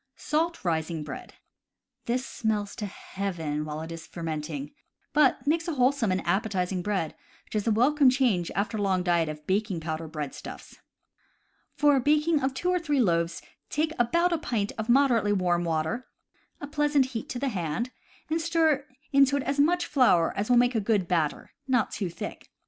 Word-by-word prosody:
Salt 325 - -1
rising 160 -1 -1
Bread. - - -8 0.3
— - - -56
This 250 +2 0
smells 210 -4 -2
to 210 - -3
heaven 170 -7 -4
while 155 0 -5
it 160 +1 -7
is 165 -1 -8
fermenting, 155 -3 -5 0.4
but 295 -2 +3
makes 330 +4 +1
wholesome 260 - +2
and 185 - -1
appetizing 190 -1 0
bread, 190 -5 -1 0.3
which - - -14
is 215 0 -1
a - - +4
welcome 270 +5 +4
change 245 -10 +2
after 210 +2 -1
a - - -2
long 190 -2 +1
diet 170 -3 +2
of 150 0 -7
baking 195 -1 0
powder 160 0 -4
breadstuffs. 150 -3 -7 1.0
For 290 -1 +4
a - - +3
baking 300 +3 +3
of 265 0 -1
two 360 +6 0
or 360 - +2
three 295 -5 0
loaves 170 -6 +1 0.3
take 310 +2 0
about 340 +9 +3
a 335 - 0
pint 215 -8 -1
of 220 +1 -5
moderately 235 -5 +4
warm 175 -3 +1
water 165 +9 -1 0.5
(a - - -5
pleasant 295 -1 +2
heat 225 - -4
to - - -3
the 275 +2 -1
hand) 185 +4 -2 0.4
and 320 +2 0
stir 320 -4 +2 0.3
into 275 0 +5
it 280 - -2
as 275 +1 -2
much 345 +4 +3
flour 235 - +3
as 205 +3 -2
will 245 - +5
make 245 +1 +4
a 225 - +1
good 200 -3 +1
batter, 165 -5 -1 0.2
not 250 -4 +2
too 195 -4 -3
thick. 170 - -7
220 Hz, 185 wpm, -27 LUFS, 175-280 Hz, 1.0 s, into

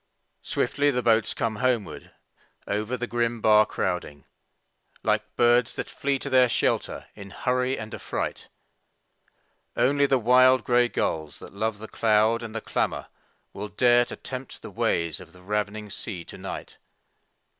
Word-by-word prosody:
Swiftly 145 0 +1
the 125 -3 0
boats 115 -1 +2
come 110 -2 -1
homeward, 120 -4 -1 0.6
over 105 +5 -2
the 120 - -2
grim 120 -1 -1
bar 105 -1 +5
crowding, 90 -6 -3 0.8
Like - - +2
birds 120 0 +3
that - - -5
flee 140 0 -1
to 140 - -5
their 130 -1 +5
shelter - - 0
in 100 -2 -10
hurry 125 +4 -1
and 110 0 -7
affright. - - -4 1.3
Only 140 +2 +3
the 135 - +3
wild 130 +2 +5
grey 120 0 +3
gulls 80 -9 -2
that - - -12
love 110 +1 -2
the 110 +1 -9
cloud 110 +1 +2
and 115 -1 -7
the 115 - -2
clamor - - -2 0.4
Will 105 +2 -5
dare 120 +1 +4
to - - -7
tempt 130 0 -8
the - - -8
ways 85 -2 0
of 90 -2 -14
the 90 - -16
ravining 105 +1 -3
sea 95 -4 -6
to - - -10
night. - - -7
115 Hz, 155 wpm, -26 LUFS, 105-125 Hz, 1.3 s, bar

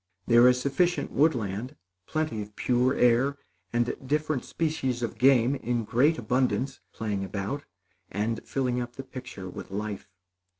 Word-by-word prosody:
There 120 +1 +7
is 125 0 +4
sufficient 175 +7 +1
woodland, 125 -3 +1 0.3
plenty 155 -8 -1
of 105 0 -9
pure 125 +1 +2
air, 125 +4 +3 0.3
and 120 0 +1
different 150 0 0
species 135 -7 -1
of 115 - -4
game, 130 -1 +5
in 120 -3 -1
great 130 +9 +3
abundance, 125 +3 0
playing 105 -3 -3
about, 100 +9 -4 0.4
and 110 +4 -2
filling 125 -2 -1
up 120 0 -6
the 135 - -6
picture 125 -7 -8
with 90 - -8
life. 105 +1 -4
125 Hz, 140 wpm, -28 LUFS, 115-135 Hz, 0.4 s, There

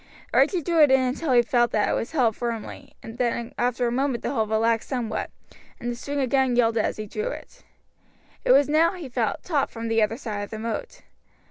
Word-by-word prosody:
Archie 360 -5 +3
drew 335 +1 +2
it 295 - +7
in 265 0 +5
until 260 +4 -1
he 240 -1 +5
felt 240 -1 +2
that 210 - +1
it - - +1
was 230 - -2
held 240 -8 +2
firmly, 235 -3 -6
then 235 0 -3
after 245 0 0
a 235 - 0
moment 260 -1 -1
the - - -1
hold 220 -5 0
relaxed 225 +1 +1
somewhat, 245 -5 -2 0.5
and 240 - -3
the - - -4
string 285 +4 -4
again 265 -1 +2
yielded 230 -2 +2
as - - -2
he 215 - -5
drew 430 - -4
it. - - -8 0.8
It - - +3
was 275 +2 +6
now, 320 +4 +3
he 350 -6 -7
felt, 240 -3 -2
taut 295 -6 0
from 230 0 -6
the 225 0 +2
other 215 +2 +1
side 215 -6 -5
of 205 - -6
the 220 - -6
moat. 230 - -5
240 Hz, 220 wpm, -25 LUFS, 225-275 Hz, 0.8 s, it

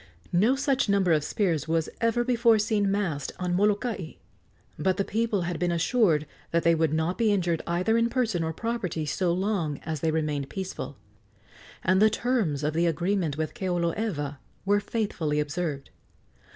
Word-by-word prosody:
No 215 +10 +4
such 275 -4 +1
number 195 -3 +3
of 155 -2 +3
spears 165 -4 0
was 165 0 +1
ever 230 +1 +2
before 235 -2 +4
seen 210 -2 +1
massed 185 -9 -1
on 180 -1 -2
Molokai; 205 -2 0 0.7
but 185 +4 +1
the 200 - 0
people 220 -2 0
had 175 -1 -3
been 175 -1 +1
assured 170 - +2 0.2
that 170 0 +1
they 170 - +5
would 160 -2 +1
not 160 +4 -1
be 225 -2 +3
injured 175 -5 +1
either 185 +7 +2
in 230 0 +2
person 230 -8 0
or 160 - -1
property 185 -5 -3
so 175 +4 0
long 180 -5 -1
as 160 -2 -3
they 160 - 0
remained 150 -3 -1
peaceful, 190 -1 -5 0.9
and 190 +1 +3
the 215 - +7
terms 215 - 0
of 150 +1 0
the 170 +2 +2
agreement 170 -1 0
with 155 0 -2
Keoloewa 175 -6 -2 0.3
were 205 +1 +3
faithfully 200 -8 -1
observed. 150 -1 -3
180 Hz, 165 wpm, -27 LUFS, 160-215 Hz, 0.9 s, the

